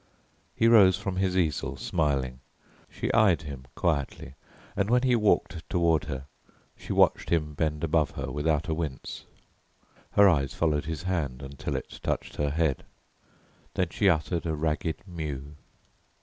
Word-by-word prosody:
He 115 - +3
rose 100 -6 +7
from 95 -1 -4
his 95 -1 +1
easel 80 -6 0
smiling. 70 -6 -1 0.5
She - - -3
eyed 90 -8 +4
him 70 -3 -8
quietly, 70 -5 -1 0.4
and 100 +1 0
when 125 +1 +3
he 125 -2 +4
walked 105 -6 +1
toward 85 -3 +2
her 65 -3 -5 0.5
she - - -8
watched - - +3
him 75 -3 0
bend 75 0 -1
above 80 -1 +2
her - - -3
without 75 +2 0
a 80 - 0
wince; 80 -4 -5 0.9
her 100 0 +7
eyes 70 -7 +2
followed 75 -3 +1
his 80 +2 -4
hand 75 -8 -2
until 70 0 -5
it - - -6
touched - - -3
her 75 -1 +1
head. 75 -3 0 0.9
Then 90 -2 +1
she 100 +2 +2
uttered 85 0 0
a 80 - -1
ragged 80 +2 -2
mew. 75 -5 -5
80 Hz, 150 wpm, -27 LUFS, 75-90 Hz, 0.9 s, rose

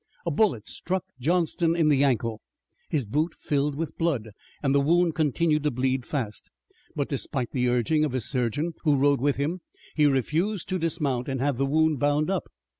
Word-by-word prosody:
A 170 - 0
bullet 150 - +1
struck 185 0 -3 0.2
Johnston 165 +3 +1
in 165 -2 +3
the 140 -2 +4
ankle. 115 -5 0 0.5
His 145 -6 0
boot 150 +10 -1
filled 145 0 -1
with 160 +2 -5
blood, 140 -10 0 0.3
and 135 -1 +2
the 140 - +4
wound 170 +3 +3
continued 155 0 +1
to 150 - +1
bleed 130 -1 -1
fast. 115 -8 -4 0.5
But, - - -1
despite 125 -3 -2
the 125 -2 +1
urging 125 +6 +2
of 150 -4 -1
his 130 -4 -1
surgeon, 140 +6 -1
who 150 -3 +3
rode 140 -1 +3
with 145 0 +2
him, 160 +6 -2 0.3
he 150 -1 +4
refused 160 - 0
to 185 -1 -1
dismount 150 -7 -1
and 135 -1 -2
have 140 -1 0
the 135 - +2
wound 155 0 +2
bound 145 +5 +1
up. 190 - -2
145 Hz, 190 wpm, -26 LUFS, 130-165 Hz, 0.5 s, the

